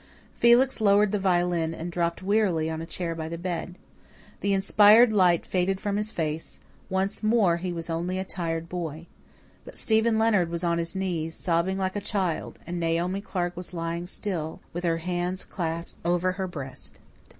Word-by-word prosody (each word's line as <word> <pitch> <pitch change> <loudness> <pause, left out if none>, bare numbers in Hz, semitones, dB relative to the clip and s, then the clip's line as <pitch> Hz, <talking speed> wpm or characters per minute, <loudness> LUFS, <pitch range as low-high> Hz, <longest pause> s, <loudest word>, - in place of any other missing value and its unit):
Felix 240 +1 +4
lowered 205 -1 +4
the 210 - 0
violin 175 -3 +1
and 170 +2 -5
dropped 170 +1 -1
wearily 190 -6 +2
on 160 0 -4
a 165 - -6
chair 170 -1 -3
by 160 -1 -5
the 170 - -4
bed. 180 0 -4 0.6
The 200 - 0
inspired 210 +4 +6
light 180 -4 +4
faded 190 +1 0
from 205 0 -2
his 210 +1 -1
face; 160 -3 -3 0.3
once 190 +1 -1
more 215 -6 +3
he 180 +1 -3
was 165 -1 -4
only 170 +3 -2
a 190 - -1
tired 165 -3 -3
boy. 165 -2 -5 0.6
But - - -11
Stephen 220 0 +3
Leonard 210 -6 +3
was 170 +1 -3
on 170 -1 +1
his 170 +2 -2
knees, 170 -4 -2
sobbing 175 +2 0
like 190 0 -1
a 205 - -2
child; 190 -5 -2
and 175 +1 -4
Naomi 170 +3 0
Clark 175 -3 -3
was 180 +1 -7
lying 170 +1 -3
still, 175 -5 -4
with 175 +1 -4
her 165 -1 +2
hands 180 +2 -2
clasped 170 -2 -4
over 175 +2 +1
her 190 0 -3
breast. 140 -7 -7
180 Hz, 180 wpm, -26 LUFS, 165-195 Hz, 0.6 s, inspired